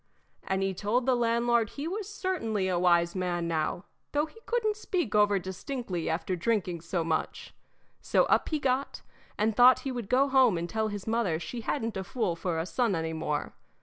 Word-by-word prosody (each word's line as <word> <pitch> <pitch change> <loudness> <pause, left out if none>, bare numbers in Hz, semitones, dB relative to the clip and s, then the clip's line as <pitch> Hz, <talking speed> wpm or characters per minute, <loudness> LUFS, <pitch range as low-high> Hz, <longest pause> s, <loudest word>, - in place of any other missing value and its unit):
And 190 0 -1
he 195 0 0
told 215 +6 0
the 260 - +3
landlord 235 -1 +2
he 290 +3 -5
was 400 +3 -4
certainly 270 - -1
a 180 -2 +1
wise 170 -1 +3
man 175 -2 -1
now, 165 +2 -1 0.3
though 295 +1 +2
he 385 +8 -16
couldn't 440 -3 +1
speak 360 - -2
over 205 -1 +4
distinctly 190 0 -4
after 175 +3 -1
drinking 180 -3 -1
so 170 +1 -2
much. 160 -1 -3 0.5
So - - +3
up - - +2
he 310 - 0
got, 270 -1 -1 0.3
and 215 +1 +1
thought 250 +2 +7
he 270 - -3
would 240 -6 -5
go 265 +2 +4
home 260 -8 +4
and 170 +1 -3
tell 220 +3 -1
his 205 -2 -5
mother 220 -8 0
she 235 +8 -6
hadn't 225 -3 -2
a 190 - -3
fool 190 -3 -1
for 170 -1 -2
a 160 - -1
son 225 +1 0
any 160 0 -2
more. 150 -2 -2
210 Hz, 195 wpm, -29 LUFS, 175-255 Hz, 0.5 s, thought